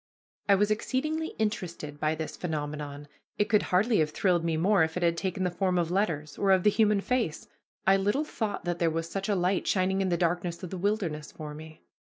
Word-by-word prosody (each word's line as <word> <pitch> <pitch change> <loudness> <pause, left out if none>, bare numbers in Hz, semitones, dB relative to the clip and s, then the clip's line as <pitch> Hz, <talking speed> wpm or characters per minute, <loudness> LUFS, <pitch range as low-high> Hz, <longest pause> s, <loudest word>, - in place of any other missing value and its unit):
I 200 - +7
was 205 +2 +2
exceedingly 305 +9 -1
interested 170 -9 -3
by 155 +1 +1
this 160 0 -5
phenomenon. 145 -3 -4 0.3
It 210 - +1
could 210 - +4
hardly 205 +4 +3
have 155 -1 +2
thrilled 175 +1 +1
me 165 -1 0
more 195 +4 +3
if 160 +2 -2
it 180 - -1
had 170 -1 +3
taken 185 +1 -2
the 180 - 0
form 185 0 0
of 170 -1 0
letters, 160 -7 -1
or 200 - +2
of 190 -2 +5
the 210 - +5
human 210 -2 +3
face. 230 -10 -1 0.4
I 195 +1 +5
little 205 +9 +1
thought 220 -10 -3
that 175 -1 -2
there 170 - +3
was 165 +1 -2
such 195 +3 -4
a 205 - +2
light 185 +1 0
shining 190 0 +2
in 190 - +1
the 175 - +1
darkness 175 0 -1
of 180 - -6
the 190 - -4
wilderness 175 -7 -1
for 150 -2 -7
me. 155 +1 -11
180 Hz, 220 wpm, -28 LUFS, 160-205 Hz, 0.4 s, I